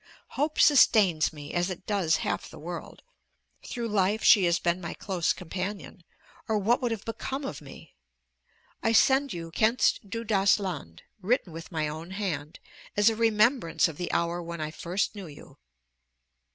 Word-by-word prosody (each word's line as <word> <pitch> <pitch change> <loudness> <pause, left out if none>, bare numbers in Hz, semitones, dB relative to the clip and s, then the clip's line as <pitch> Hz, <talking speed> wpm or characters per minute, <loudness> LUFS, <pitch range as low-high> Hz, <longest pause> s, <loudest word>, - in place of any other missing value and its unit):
Hope 300 +2 -2
sustains 205 - +5
me, 145 -2 -9
as 175 +1 0
it 185 0 -7
does 190 -6 +1
half - - -2
the - - -12
world; 170 +3 -8 0.6
through 235 -2 -4
life 205 0 +1
she 205 -5 +7
has 170 0 +3
been 175 0 -1
my 170 - -5
close 185 -5 -1
companion, 185 +1 -6 0.4
or 220 - +1
what 235 +7 +2
would 245 - 0
have 225 -3 -4
become 265 +4 -4
of - - -6
me? - - -13 0.9
I 225 - +1
send 270 +4 +4
you 165 -1 -6
'Kennst 215 +1 +1
Du 230 +3 -4
das 200 -3 +3
Land,' 155 - -6 0.2
written 200 -3 0
with 165 +2 -9
my 155 -3 -1
own 160 +3 -7
hand, 180 -7 -4 0.4
as 205 +2 +5
a - - -3
remembrance 225 -2 +2
of 160 -3 -8
the 175 - -3
hour 170 +1 0
when 170 0 -7
I 155 0 -3
first 175 +5 -2
knew 200 -4 -8
you.... 145 - -14
190 Hz, 170 wpm, -27 LUFS, 170-220 Hz, 0.9 s, she